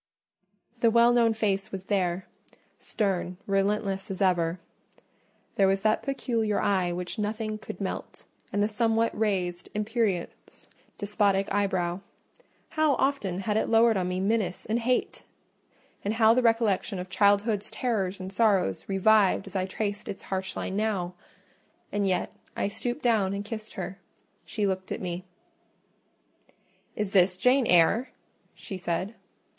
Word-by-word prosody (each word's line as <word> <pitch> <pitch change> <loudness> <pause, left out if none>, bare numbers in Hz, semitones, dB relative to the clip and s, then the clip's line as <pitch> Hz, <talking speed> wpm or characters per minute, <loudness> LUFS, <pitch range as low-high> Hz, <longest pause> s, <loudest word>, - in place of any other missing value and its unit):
The 230 - +4
well 235 +1 +5
known 230 -2 +3
face 200 -3 -1
was 190 -1 -6
there: 185 -2 0 0.5
stern, 185 -3 -2
relentless 195 0 0
as 195 - -5
ever—there 180 +2 -2
was 195 0 +1
that 215 0 +2
peculiar 230 -6 -1
eye 185 -3 +1
which 180 +5 -4
nothing 215 0 -2
could - - -8
melt, - - -5 0.3
and 205 - +1
the - - +3
somewhat 225 +1 +1
raised, 185 -5 -1
imperious, 210 -4 -2 0.3
despotic 200 -2 +1
eyebrow. 185 -3 0 0.7
How 310 -3 +2
often 210 -10 0
had 210 +2 0
it - - 0
lowered 225 0 +5
on 185 -2 0
me 180 0 -2
menace 195 -2 0
and 225 +2 0
hate! 250 +2 -1 0.8
and 205 +2 -1
how 225 0 +6
the 255 - +3
recollection 225 -4 +1
of 180 +1 -5
childhood's 205 +2 +2
terrors 200 -6 -1
and 190 +1 -7
sorrows 195 - +1
revived 195 0 +4
as 195 0 -10
I 185 -1 0
traced 205 +1 -3
its 195 - -6
harsh 190 0 -3
line 190 - -3
now! 200 -4 -1 0.8
And 205 -1 0
yet 185 -1 0 0.2
I - - -1
stooped 240 +6 -4
down 210 -5 +2
and 200 +1 -4
kissed 215 0 -7
her: 190 +1 -5 0.5
she 210 -2 -2
looked 190 -1 -2
at - - -2
me. 180 -1 -4 1.7
"Is 210 -2 -2
this 180 -1 +4
Jane 250 +3 +3
Eyre?" 180 +9 +4 0.5
she 195 - -7
said. 185 +3 -2
200 Hz, 140 wpm, -27 LUFS, 190-220 Hz, 1.7 s, how